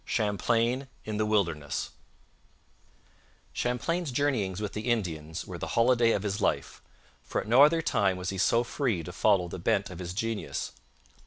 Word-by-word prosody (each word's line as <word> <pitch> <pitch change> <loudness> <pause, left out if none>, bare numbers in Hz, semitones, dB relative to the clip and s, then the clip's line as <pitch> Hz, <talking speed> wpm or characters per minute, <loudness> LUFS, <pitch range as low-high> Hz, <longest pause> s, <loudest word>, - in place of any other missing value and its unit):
CHAMPLAIN 115 +5 +1 0.2
IN 110 -1 -3
THE 110 0 +1
WILDERNESS 85 -9 0 1.6
Champlain's 145 +6 -1
journeyings 120 -9 0
with 105 -2 -4
the 110 +3 -3
Indians 80 -9 -2
were - - -7
the - - -4
holiday 115 0 +4
of 100 - -1
his 100 0 -2
life, - - -1 0.4
for - - -3
at - - -10
no 120 +5 +6
other 165 +3 +6
time 95 -8 +1
was 90 +1 -3
he 95 - -4
so 115 +4 +3
free 120 - -1
to 90 - -7
follow 95 -2 +3
the 85 - -7
bent 95 +3 0
of 90 - -8
his 90 0 -5
genius. 115 +1 -3
105 Hz, 165 wpm, -28 LUFS, 95-120 Hz, 1.6 s, no